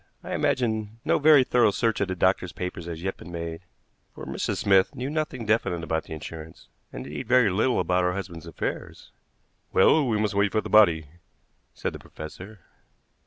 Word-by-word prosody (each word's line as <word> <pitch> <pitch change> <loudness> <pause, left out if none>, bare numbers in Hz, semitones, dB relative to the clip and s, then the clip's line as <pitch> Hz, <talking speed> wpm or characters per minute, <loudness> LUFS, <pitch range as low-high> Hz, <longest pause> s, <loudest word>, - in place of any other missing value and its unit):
"I - - -5
imagine 110 -3 -1
no - - +2
very 150 -2 +7
thorough 120 -3 +3
search 110 +1 0
of 100 - +1
the 95 - -3
doctor's 90 0 +1
papers 90 -1 -6
has 85 0 -6
yet 95 - -3
been 90 - -11
made, 85 -1 -5 0.5
for - - -8
Mrs. - - -3
Smith 95 +5 +3
knew 130 +2 -4
nothing 150 -6 -3
definite 105 -6 0
about 80 -1 -2
the - - -8
insurance, 80 0 -9 0.2
and, 60 - -7
indeed, 70 0 -6
very 125 -5 +4
little 110 +7 +1
about 90 +1 +1
her 90 - +1
husband's 85 -4 -7
affairs." 85 - -6 0.6
"Well, 150 -4 +4
we 110 -3 +1
must 105 -1 0
wait 100 0 +1
for 110 - +2
the - - -8
body," 85 -7 +5 0.7
said - - -3
the - - -8
professor. 95 +6 -10
95 Hz, 185 wpm, -26 LUFS, 85-115 Hz, 0.7 s, very